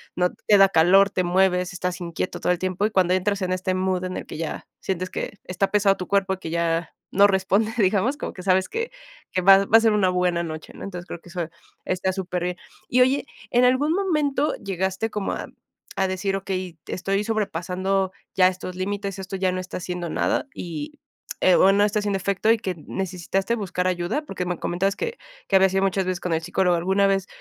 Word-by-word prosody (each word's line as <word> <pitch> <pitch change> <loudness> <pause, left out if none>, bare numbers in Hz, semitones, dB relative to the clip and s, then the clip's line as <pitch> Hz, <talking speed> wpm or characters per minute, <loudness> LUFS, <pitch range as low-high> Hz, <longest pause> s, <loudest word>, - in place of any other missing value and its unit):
no 180 0 +1 0.2
te 205 - +7
da 195 0 +7
calor, 195 +4 +5
te 185 - 0
mueves, 180 0 +2
estás 180 0 -3
inquieto 170 +1 -4
todo - - +1
el 180 - +1
tiempo. 185 +2 -1
Y - - -7
cuando 185 -3 +3
entras 195 +2 0
en 185 0 0
este 185 0 -1
mood 185 -1 0
en 185 0 -4
el - - -6
que - - -8
ya 165 -1 -5
sientes 185 -1 -2
que - - -4
está 185 +2 -1
pesado 200 -1 +4
tu 180 - -6
cuerpo, 195 -1 +1
que 165 - -6
ya 170 0 0 0.2
no 200 +1 +6
responde, 200 +3 +1
digamos, 215 +6 +2
como - - -5
que 185 - -9
sabes 185 0 +3
que, 460 +2 -3 0.4
que 185 - 0
va, 195 +1 +8
va 225 - +6
a - - +6
ser 225 -1 +4
una 200 -3 +3
buena 180 -1 +1
noche, 155 -1 -7
¿no? - - -10
Entonces, 180 -3 -6
creo - - -7
que 175 - -15
eso 175 -2 -3 0.4
está 185 +1 0
superbién. 180 -1 -3 0.3
Y 250 - +4
oye, 265 +3 +3 0.3
¿en 245 +1 +4
algún 260 +5 +3
momento 305 -6 +1
llegaste 190 +2 -2
como 210 -2 -2
a, - - -5 0.5
a 190 -1 +1
decir: 190 +1 -1
"Okey, 185 -3 -4
estoy 195 +2 -1
sobrepasando 190 -2 -1 0.2
ya 185 -1 +5
estos 185 0 -4
límites, 195 +1 -3
esto 190 0 -5
ya 190 -1 +1
no 185 - -2
está 185 - -6
haciendo 180 -1 -4
nada" 270 - 0
y, 170 - -6 0.4
eh, 185 - +5
o 190 - +6
no 205 - +4
está 210 +1 0
haciendo 205 -1 -1
efecto 200 +3 0
y 230 - +4
que 190 -4 -4
necesitaste 190 +3 -2
buscar 185 -4 -2
ayuda? 180 - -1
Porque 185 -9 -4
me 180 -1 -2
comentas 195 +3 0
que 470 - -4 0.3
que 195 - +3
habías 190 0 +4
ido 195 - +2
muchas 195 0 +1
veces 185 -1 -2
con 180 - -3
el 160 - 0
psicólogo. 180 +1 +1
¿Alguna 190 +3 +2
vez 195 -1 0
190 Hz, 215 wpm, -24 LUFS, 180-200 Hz, 0.5 s, va